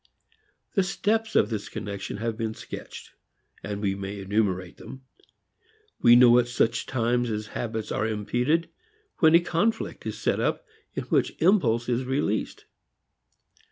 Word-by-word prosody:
The 195 - +3
steps 220 +4 -1
of 105 - +3
this 105 -2 -4
connection 100 -2 -5
have 115 +1 -2
been 110 -1 -3
sketched - - -9 0.5
and 100 0 -5
we 95 -1 +1
may 100 +1 -6
enumerate 95 -2 -1
them. 135 0 -11 1.0
We 120 0 +7
know 120 0 +7
at 120 - +1
such 115 -1 0
times 120 -1 0
as 105 -1 -3
habits 110 -2 -4
are 110 - 0
impeded, 120 +10 0 0.5
when 160 -1 +6
a - - +8
conflict 175 +6 -1
is - - -4
set - - 0
up - - -1 0.3
in - - -2
which - - 0
impulse 120 - +3
is 125 +1 0
released. 130 -5 -2
115 Hz, 145 wpm, -26 LUFS, 105-130 Hz, 1.0 s, a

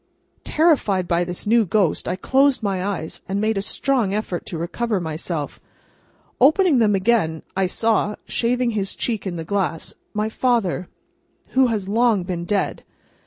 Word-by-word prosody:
Terrified 265 - +2
by 170 0 +2
this 175 0 -6
new 230 +2 +4
ghost, 195 -3 0
I 180 - 0
closed 265 +5 +2
my 195 -3 -1
eyes, 190 -5 -4
and 195 +1 -1
made 215 +1 +1
a 195 - 0
strong 230 -2 0
effort 200 -5 -3
to 170 - -4
recover 205 +6 -2
myself. 160 -2 -4 0.8
Opening 310 +1 +5
them 210 -3 +3
again, 190 -6 +1
I 190 -1 +1
saw, 215 +1 +1
shaving 245 0 0
his 200 -3 -2
cheek 220 -5 -2
in 180 - -3
the 165 - -4
glass, 185 -3 -2 0.2
my 210 +1 0
father, 220 -6 0 0.6
who 260 0 +4
has 215 -5 -2
long 220 -2 +2
been 175 -1 -4
dead. 200 +1 -1
205 Hz, 160 wpm, -22 LUFS, 180-235 Hz, 0.8 s, Opening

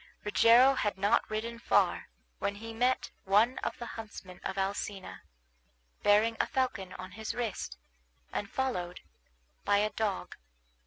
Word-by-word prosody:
Rogero 230 +5 +6
had 210 -6 -1
not 200 +2 +2
ridden 230 +2 -3
far - - +2 0.3
when 200 - -1
he 225 +2 -8
met 245 +1 +1
one 215 +6 +3
of - - -3
the 240 - -6
huntsmen 210 -6 -9
of 190 - -4
Alcina, 195 0 -3 0.8
bearing 215 +2 +4
a - - +2
falcon 250 -9 -1
on 185 0 -8
his 220 +3 -5
wrist, 235 -4 -3 0.6
and 200 - -3
followed 180 -10 -2 0.6
by 205 - +3
a 210 +1 +1
dog. 210 -3 -2
215 Hz, 140 wpm, -31 LUFS, 195-235 Hz, 0.8 s, Rogero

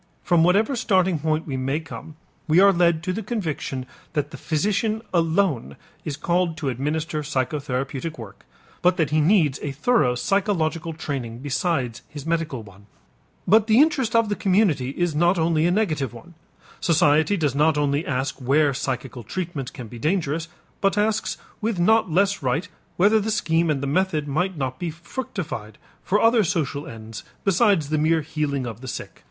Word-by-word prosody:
From 175 -2 +3
whatever 205 +10 +3
starting 190 -8 +2
point 155 +1 0
we 135 -4 -3
may 135 +4 -1
come, 160 -1 -10 0.3
we 160 +3 +5
are 200 +1 +7
led 170 -2 +2
to 185 - -1
the 220 - -3
conviction 160 - -3 0.3
that 150 0 -1
the - - -8
physician 210 - 0
alone 165 - +1 0.3
is 145 -2 -4
called 170 +1 0
to 145 -4 -2
administer 150 +5 -2
psychotherapeutic 140 +1 -3
work, 110 -4 -11 0.4
but 180 0 +3
that 155 -3 +1
he 155 0 +3
needs 155 -5 +3
a 145 - -3
thorough 150 - +2
psychological 170 - 0
training 130 -7 -5
besides 135 -2 -1
his 145 -1 -8
medical 165 -7 -2
one. 100 0 -16 0.6
But 215 +3 +5
the 220 +2 +5
interest 275 -7 +3
of 230 -1 +4
the 205 - 0
community 185 -11 +2
is 175 +3 -1
not 175 +4 +3
only 165 0 +2
a - - +2
negative 155 - 0
one. 170 +9 -13 0.5
Society 160 +3 +3
does 150 -6 0
not 150 +2 +3
only 145 +1 +1
ask 140 -1 -2
where 140 +2 +2
psychical 130 -1 -4
treatment 155 - -5
can 120 - -8
be 120 +2 -10
dangerous, 165 0 -1 0.3
but 195 +1 +2
asks 215 +1 0 0.2
with 220 -2 -1
not 220 +3 +4
less 195 +3 +2
right 135 +8 -1 0.3
whether 210 +4 +5
the 215 +1 -2
scheme 170 -6 +1
and 140 -2 0
the - - 0
method 155 0 0
might 175 +5 -1
not 130 -2 -3
be 175 - -2
fructified 165 - -6 0.2
for 205 - +1
other 225 0 +4
social 155 -3 -2
ends 110 - -9 0.2
besides 195 -5 +3
the 155 0 +1
mere 160 +1 +3
healing 150 -4 -2
of 115 -1 -7
the 130 - -8
sick. - - -7
160 Hz, 175 wpm, -23 LUFS, 140-185 Hz, 0.6 s, are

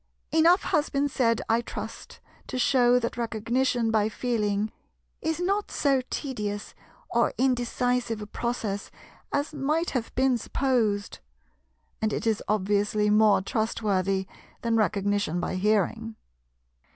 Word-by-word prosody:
Enough 330 +4 +5
has 300 -1 +1
been 280 +1 +1
said, 230 -4 +1
I 225 +1 +2
trust, - - -8 0.3
to - - -4
shew 250 -1 +4
that 235 0 -3
Recognition 235 +1 0
by 215 -1 +2
Feeling 215 -3 -1 0.5
is 320 +1 -1
not 395 +3 0
so 275 -3 +2
tedious 210 -7 -4 0.4
or - - +2
indecisive 245 -2 0
a 210 - -6
process 215 -2 -3 0.4
as 285 +2 -1
might 305 +4 0
have 245 -4 -2
been 260 -1 +2
supposed; 225 -6 0 0.8
and 220 0 +1
it - - -2
is 220 -2 +1
obviously 210 +1 +1
more 210 -2 +5
trustworthy 195 -3 0 0.4
than 230 -1 +1
Recognition 205 -4 +1
by 175 - -2
hearing. 215 +3 0
230 Hz, 125 wpm, -27 LUFS, 210-260 Hz, 0.8 s, Enough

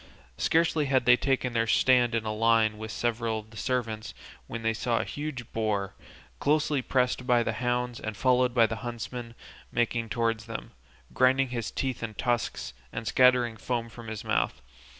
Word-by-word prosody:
Scarcely 160 -2 +2
had 130 -2 +2
they 125 - +8
taken 130 -1 0
their 115 -1 +1
stand 120 0 +4
in 115 -1 -1
a 110 - -1
line 110 -1 +3
with 110 0 -6
several 115 -1 -1
of 110 0 -9
their 110 - -12
servants, 115 -4 -2 0.3
when 115 0 -6
they 115 0 +2
saw 115 +1 0
a - - +1
huge 145 -5 -6
boar, 105 -3 -1 0.5
closely 150 -1 +2
pressed 125 0 0
by 120 -2 +4
the 110 - -1
hounds 125 +1 -1
and 110 -2 -5
followed 125 0 +3
by 115 -2 +6
the 110 0 -3
huntsmen, 120 0 -6 0.4
making 120 -1 0
towards 115 -1 0
them, 115 - -6 0.4
grinding 130 +1 +3
his 120 -3 -3
teeth 130 -2 -3
and 110 -2 -5
tusks, 115 - -1 0.2
and 115 - -5
scattering 125 -2 +4
foam 115 0 -2
from 115 0 -11
his 110 -2 -5
mouth. - - 0
120 Hz, 175 wpm, -28 LUFS, 110-125 Hz, 0.5 s, they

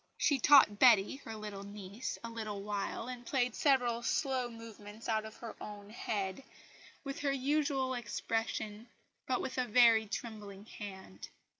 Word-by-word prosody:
She 285 -3 +2
taught 255 -6 +7
Betty 235 -1 +6
(her 225 -5 -8
little 210 -2 -6
niece) 200 +2 -6
a 230 - -4
little 215 -3 -5
while, 205 +2 -3
and 250 -1 -6
played 250 -1 0
several 245 -4 +2
slow 255 0 0
movements 225 -1 -10
out 220 -1 0
of 220 - -9
her 230 -2 -8
own 205 0 -8
head, 200 0 -3 0.6
with 275 -1 -5
her 285 -1 +1
usual 275 -1 +1
expression, 225 -1 -3 0.4
but 255 - +1
with 260 0 -3
a 250 - +2
very 230 -1 +6
trembling 205 -2 -6
hand. 190 - -9
225 Hz, 150 wpm, -33 LUFS, 205-255 Hz, 0.6 s, taught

